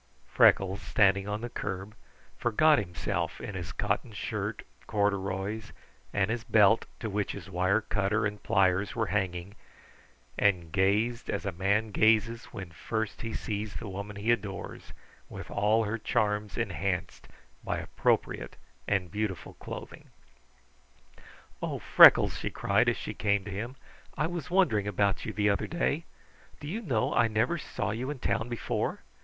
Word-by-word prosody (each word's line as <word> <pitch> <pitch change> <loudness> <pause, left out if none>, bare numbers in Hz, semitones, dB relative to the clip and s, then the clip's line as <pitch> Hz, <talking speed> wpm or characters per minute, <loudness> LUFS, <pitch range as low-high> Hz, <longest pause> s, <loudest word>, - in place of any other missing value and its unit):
Freckles, 95 +1 +4
standing 100 -1 +3
on 105 +1 -3
the 120 - -4
curb, 95 -1 -5 0.4
forgot 150 +6 +4
himself 90 -3 -3
in 105 - -6
his 90 -3 -5
cotton - - -1
shirt, - - -4 0.2
corduroys, 100 +1 -1 0.4
and 100 +1 +1
his 115 0 -2
belt 110 0 +4
to 115 - -3
which 105 -1 -2
his 95 -1 -9
wire 95 +4 +2
cutter 105 +1 0
and 105 0 -3
pliers 95 +1 +2
were 115 -2 +1
hanging, 95 -1 -2 0.9
and 90 -5 +2
gazed 105 +6 +1
as - - -2
a 100 - -1
man 100 +5 0
gazes 110 +2 +3
when 95 -6 -8
first 110 +6 -3
he 115 - -4
sees 105 -1 -4
the 115 - -5
woman 100 +2 -6
he 105 +4 +1
adores 100 -5 -4 0.4
with - - -8
all 110 +2 +2
her 110 +2 -2
charms 105 -1 0
enhanced 95 -5 -2 0.4
by - - -2
appropriate - - -1 0.3
and 95 -4 0
beautiful 105 -2 -3
clothing. - - -9 1.5
"Oh - - -2
Freckles," - - +7
she - - -2
cried - - +2
as - - 0
she - - -5
came 100 -2 +1
to 105 - -6
him. 115 +7 -5 0.4
"I 150 - +1
was 170 -1 -4
wondering 175 - +2
about 100 -1 0
you - - -3
the 105 -1 +2
other 100 - -1
day. 170 -1 -1 0.5
Do 145 - -8
you 205 +9 -3
know 130 - 0
I 120 - +4
never 115 +10 0
saw 110 - -3
you 120 +5 -3
in 145 - -4
town 120 -1 -1
before. 120 -3 -2
105 Hz, 155 wpm, -29 LUFS, 95-115 Hz, 1.5 s, Freckles